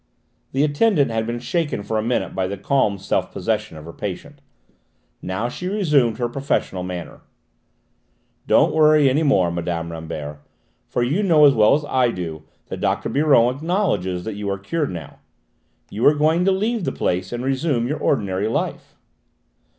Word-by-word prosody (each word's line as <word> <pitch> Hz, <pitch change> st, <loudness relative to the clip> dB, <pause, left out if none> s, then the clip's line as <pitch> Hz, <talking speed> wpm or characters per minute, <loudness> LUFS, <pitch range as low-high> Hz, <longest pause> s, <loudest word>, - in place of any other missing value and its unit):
The 135 Hz, +2 st, +1 dB
attendant 150 Hz, -, +2 dB
had 110 Hz, 0 st, -1 dB
been 120 Hz, +1 st, -2 dB
shaken 150 Hz, -, -2 dB
for 110 Hz, +1 st, -1 dB
a -, -, 0 dB
minute 120 Hz, +3 st, -1 dB
by 95 Hz, -1 st, -1 dB
the 100 Hz, +1 st, -5 dB
calm 105 Hz, 0 st, +1 dB
self 95 Hz, -, -2 dB
possession 110 Hz, -6 st, -2 dB
of 75 Hz, -, -10 dB
her 85 Hz, -, -9 dB
patient; -, -, -7 dB, 0.8 s
now 95 Hz, +6 st, -2 dB
she 180 Hz, +9 st, -6 dB
resumed 150 Hz, -, +2 dB
her 120 Hz, -1 st, -1 dB
professional 120 Hz, -7 st, -2 dB
manner. 90 Hz, -3 st, -7 dB, 1.3 s
"Don't -, -, +4 dB
worry 155 Hz, -2 st, +5 dB
any 135 Hz, +4 st, +2 dB
more, 95 Hz, -, +3 dB
Mme. 85 Hz, -1 st, -3 dB
Rambert, 80 Hz, -3 st, -6 dB, 0.5 s
for 120 Hz, -, -1 dB
you 145 Hz, +12 st, 0 dB
know 165 Hz, -7 st, +5 dB
as 140 Hz, -, +6 dB
well 110 Hz, +2 st, +5 dB
as 150 Hz, 0 st, -2 dB
I 130 Hz, -3 st, +2 dB
do 85 Hz, -7 st, -5 dB, 0.2 s
that -, -, -7 dB
Dr. -, -, 0 dB
Biron 135 Hz, -4 st, +3 dB
acknowledges 150 Hz, -, -1 dB
that 110 Hz, -, -4 dB
you 100 Hz, 0 st, -4 dB
are 100 Hz, -, -1 dB
cured 145 Hz, +11 st, -2 dB
now. 85 Hz, -5 st, -8 dB, 0.7 s
You 110 Hz, -, -4 dB
are 150 Hz, -, +5 dB
going 160 Hz, +4 st, +2 dB
to 195 Hz, -, +4 dB
leave 215 Hz, +3 st, 0 dB
the -, -, -1 dB
place 90 Hz, +1 st, -2 dB
and 120 Hz, +1 st, -4 dB
resume 135 Hz, -3 st, 0 dB
your 150 Hz, +3 st, -3 dB
ordinary 100 Hz, -8 st, 0 dB
life." 110 Hz, -, -3 dB
120 Hz, 175 wpm, -21 LUFS, 95-150 Hz, 1.3 s, as